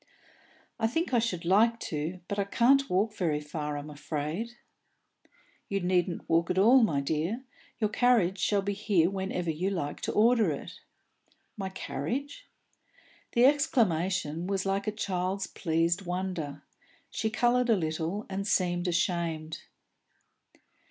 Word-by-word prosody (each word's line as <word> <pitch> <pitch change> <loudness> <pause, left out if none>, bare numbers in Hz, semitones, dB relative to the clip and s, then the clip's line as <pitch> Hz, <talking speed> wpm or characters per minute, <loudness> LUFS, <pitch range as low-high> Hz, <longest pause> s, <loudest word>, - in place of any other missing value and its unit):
"I 225 - +2
think 325 +5 -2
I 240 - +5
should 185 -7 -2
like 225 +6 +4
to, 160 +4 -4
but 200 - -3
I - - +3
can't 270 +7 +3
walk 200 +4 +1
very 160 -7 0
far, 150 0 -4
I'm 145 +1 -7
afraid." 155 +10 -4 1.1
"You 200 - 0
needn't 180 -1 0
walk 165 +1 +2
at 180 - 0
all, 235 +7 +6
my 150 -11 +2
dear. 160 - -2 0.3
Your 215 -3 0
carriage 215 -7 +3
shall 200 +3 +1
be 200 +1 -1
here 195 -4 +2
whenever 190 -3 -2
you 175 +5 -1
like 170 -7 -3
to - - -2
order 230 +1 +4
it." - - -5 0.8
"My 195 -2 -4
carriage?" 255 - -4 0.9
The 240 +1 +5
exclamation 185 - +1
was 195 -1 -1
like 195 +1 -1
a - - +2
child's 190 -2 -2
pleased 170 +2 0
wonder. 180 -6 -4 0.5
She 220 - -1
coloured 245 +2 +2
a 225 - +6
little, 165 +3 -2
and 195 +1 -4
seemed 175 -2 +1
ashamed. 170 -2 -1
190 Hz, 140 wpm, -29 LUFS, 165-220 Hz, 1.1 s, all